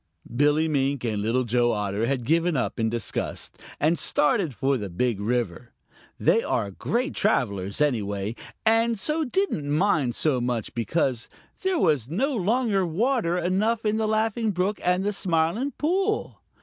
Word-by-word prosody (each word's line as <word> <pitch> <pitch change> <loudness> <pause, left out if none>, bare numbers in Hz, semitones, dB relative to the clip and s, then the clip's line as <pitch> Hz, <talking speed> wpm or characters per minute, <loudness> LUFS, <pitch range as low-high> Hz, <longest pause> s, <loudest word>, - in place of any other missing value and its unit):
Billy 150 +4 +3
Mink 140 -3 0
and 110 -3 -1
Little 115 +4 +1
Joe 120 0 +2
Otter 105 +1 -1
had 130 -3 -1
given 165 +2 +2
up 125 - -2
in 110 0 +1
disgust 115 0 -3 0.2
and 155 +3 +2
started 150 - +1
for 135 +3 +1
the 105 -6 -4
Big 110 +4 -1
River. 120 +2 -2 0.5
They - - +3
are 100 - -1
great 245 - -2
travelers, 100 - 0
anyway, 105 -7 0 0.3
and 225 +1 +3
so 305 +10 0
didn't 260 - -1
mind 150 - +1
so 140 -6 +1
much 120 -3 -2
because 120 0 -1 0.3
there 380 -1 +1
was 150 - +2
no 265 - 0
longer 215 0 +1
water 185 +1 0
enough 210 +6 0
in 210 0 +1
the 220 -1 0
Laughing 220 +1 0
Brook 195 +2 -1
and 180 +1 +2
the 205 +1 0
Smiling 180 - 0
Pool. 385 +7 -1
160 Hz, 155 wpm, -25 LUFS, -, 0.5 s, Billy